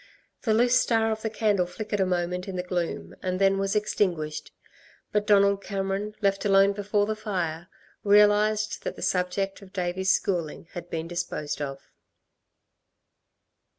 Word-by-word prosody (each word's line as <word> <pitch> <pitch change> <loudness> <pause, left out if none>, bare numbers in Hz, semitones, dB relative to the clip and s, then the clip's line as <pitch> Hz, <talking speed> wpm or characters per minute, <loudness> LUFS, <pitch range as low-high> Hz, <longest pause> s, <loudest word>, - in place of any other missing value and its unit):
The 220 -3 +2
loose 245 +2 +4
star 225 -1 +2
of 220 0 -3
the 220 - -2
candle 210 -4 +1
flickered 205 +3 -4
a 190 - +2
moment 180 +1 -1
in 190 - -5
the 180 - -2
gloom 180 -2 -3
and 185 0 -1
then 195 0 +3
was 195 +1 -1
extinguished. 175 -7 -1 0.6
But 210 0 0
Donald 200 -1 +4
Cameron, 195 +1 -3
left 195 -1 +1
alone 195 0 +5
before 205 0 0
the 215 +1 -2
fire, 175 -6 -3 0.4
realised 210 +1 +4
that - - -4
the - - -8
subject 190 +2 -1
of 190 -1 -15
Davey's 185 0 -1
schooling 175 -4 0
had 175 0 -7
been 165 0 -3
disposed 170 -4 -4
of. 135 -1 -6
195 Hz, 150 wpm, -26 LUFS, 180-210 Hz, 0.6 s, alone